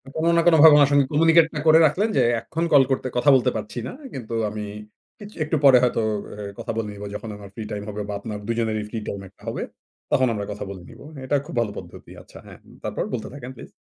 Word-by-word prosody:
কোনো 160 +1 0
না - - +5
কোনোভাবে 160 -2 +8
উনার 145 -1 +5
সঙ্গে 140 -1 +4
কমিউনিকেট 165 +2 +5
টা 150 - -3
করে 160 +1 +7
রাখলেন 195 +9 +1
যে, - - +5 0.2
"এখন 165 +1 -4
কল 140 -2 +7
করতে, 130 0 -1
কথা 145 +4 +3
বলতে 125 - +2
পারছি 220 +2 -6
না। - - -6 0.2
কিন্তু 120 -3 -7 0.2
আমি 105 0 -6 0.6
কিচ 205 0 -10
একটু 155 +1 -1
পরে 135 -2 +8
হয়তো, 120 -2 +1 0.5
এর - - -11
কথা - - -4
বলে 110 -2 -2
নিব 100 0 -10
যখন 110 - -6
আমার 100 -1 -11
ফ্রি 110 - -5
টাইম 105 -1 -4
হবে" 105 0 -5
বা - - -3
আপনার 105 -1 -6
২ 115 - -1
জনেরই 110 -2 -1
ফ্রি 115 0 -4
টাইম 100 - -4
একটা - - -31
হবে, - - -4 0.5
"তখন 130 0 +3
আমরা 100 -1 -4
কথা 105 - -6
বলে 95 -2 -8
নিব।" - - -14
হ্যাঁ, 135 -2 -9
এটা 145 +2 0
খুব 160 - -9
ভালো 110 -3 -1
পদ্ধতি। - - -11
আচ্ছা - - -16
হ্যাঁ, - - -13 0.2
তারপর? - - -3
বলতে 115 - -3
থাকেন 130 -2 -8
প্লিজ। - - -12
130 Hz, 245 wpm, -23 LUFS, 110-155 Hz, 0.6 s, কোনোভাবে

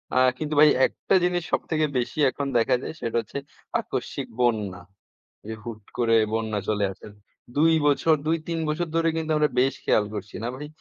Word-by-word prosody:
আ - - +3 0.2
কিন্তু 155 0 -3
ভাই 150 - +8 0.2
একটা 195 - -1
জিনিস 180 -1 +1
সবথেকে 155 -1 +1
বেশি 125 +5 -2
এখন 140 - -3
দেখা 115 - +3
যায়, - - -5
সেটা 115 -1 -1
হচ্ছে 115 - -8 0.4
আকস্মিক - - -4
বন্যা। 105 -7 0 0.7
যে 110 - -4
হুট 110 -3 -8
করে 115 -2 +3 0.2
বন্যা 110 -2 -1
চলে 105 -1 +1
আসে। 95 - -12 0.5
২ 160 +2 +5
বছর, 155 +2 +4
২ 165 +1 +2
৩ 165 -1 -2
বছর 170 +3 -1
ধরে 165 0 +3
কিন্তু 160 -1 -2
আমরা 150 0 +3
বেশ 135 +1 +2
খেয়াল 105 - +3
করছি 105 0 -7
না - - -1
ভাই? 150 +3 -7
135 Hz, 185 wpm, -25 LUFS, 110-160 Hz, 0.7 s, ভাই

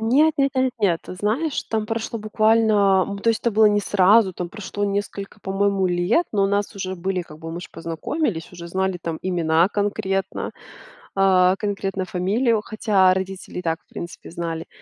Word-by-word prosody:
Нет 280 +8 +4
нет 275 0 +3
нет 260 -1 +1
нет, 175 -5 +2
ты - - -8
знаешь, 240 - -1
там 220 -1 -2
прошло 225 0 -3
буквально, 215 -3 +3
м, 200 0 -5
то 230 - -1
есть 225 - +2
это 235 - +1
было 220 0 +5
не 205 0 +3
сразу- 200 +1 +4
там 175 0 -5
прошло 205 +1 -4
несколько, 200 0 -4
по-моему, 195 -1 0
лет, 180 - +2
но 200 -2 +2
у - - +3
нас 200 +1 -1
уже 190 -1 -4
были, 185 +1 -2
как 155 -2 -13
бы, 165 0 -7
мы 175 - -5
ж - - -9
познакомились, 165 - -3
уже 170 -1 -9
знали 190 +1 -1
там 165 -2 -4
имена 170 -1 +2
конкретно, 200 -2 -2 0.7
э, 185 -1 +5
конкретно 195 -2 -2
фамилию, 210 +6 +1
хотя 205 -4 +3
родители 190 -1 -5
и - - -10
так, 165 -1 -1
в - - -50
принципе, 170 -1 -8
знали. 165 -1 -4
195 Hz, 185 wpm, -22 LUFS, 180-215 Hz, 0.7 s, было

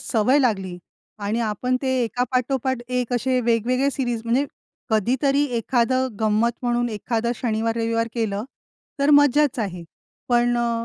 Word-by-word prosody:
सवय 250 +4 +2
लागली 195 -9 0 0.5
आणि 220 +3 -1
आपण 235 +3 -1
ते 265 - -1
एकापाठोपाठ 255 +2 -1
एक 250 -1 -2
असे 255 +1 +1
वेगवेगळे 245 +3 +1
सीरीज 245 -4 -2
म्हणजे 245 +5 +2 0.5
कधीतरी 265 +6 +2
एखादं 255 +3 +1
गंमत 220 +2 +2
म्हणून 240 0 0
एखादं 230 +2 -2
शनिवार-रविवार 230 0 -1
केलं 215 -3 -2 0.5
तर 280 +1 +3
मज्जाच 290 -1 +4
आहे. 185 -6 -3 0.5
पण 240 0 +3
अ, 235 -1 -1
240 Hz, 125 wpm, -23 LUFS, 225-255 Hz, 0.5 s, मज्जाच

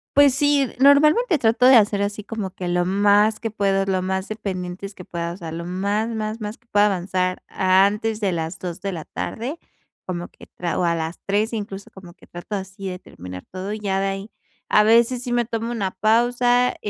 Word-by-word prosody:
Pues, 285 -2 +6
sí, 285 -1 +3
normalmente 305 - +5
trato 230 0 +2
de 260 -1 +9
hacer 205 -2 +3
así 205 +1 -3
como 220 -4 -4
que 180 - -5
lo 175 0 +1
más 205 +3 +3
que 225 - -3
puedo, 195 -2 +1
lo 190 -1 0
más 190 +1 -2
dependientes 195 -2 -5
que 180 - -12
pueda, 170 0 -4
o 175 - -8
sea, 165 -4 -7
lo 170 +1 -5
más, 200 +5 -1
más 220 0 -4
más 210 +1 -5
que 235 - -37
pueda 205 -2 +4
avanzar 185 -1 -1
antes 200 +4 +2
de 200 -4 0
las 165 +1 -4
2 175 -2 -6
de 200 - -3
la 165 -4 -6
tarde, 255 +8 -5 0.5
como 175 -1 -4
que - - -17
tra 170 -2 -2
o - - +1
a 170 -1 +2
las 160 +1 -4
3 210 +3 0
incluso 200 -3 -5
como 180 -3 -13
que - - -20
trato 175 +4 -6
así 190 0 -7
de 180 0 -6
terminar 90 - -10
todo, 185 +2 -5
y 215 - -4
ya 195 -2 -1
de 195 - 0
ahí 195 +2 -5 0.4
a 210 - +5
veces 235 +3 +4
sí 245 - -4
me 240 0 +2
tomo 230 0 -3
una 200 -5 -2
pausa, 245 +4 +2
200 Hz, 215 wpm, -22 LUFS, 185-225 Hz, 0.5 s, de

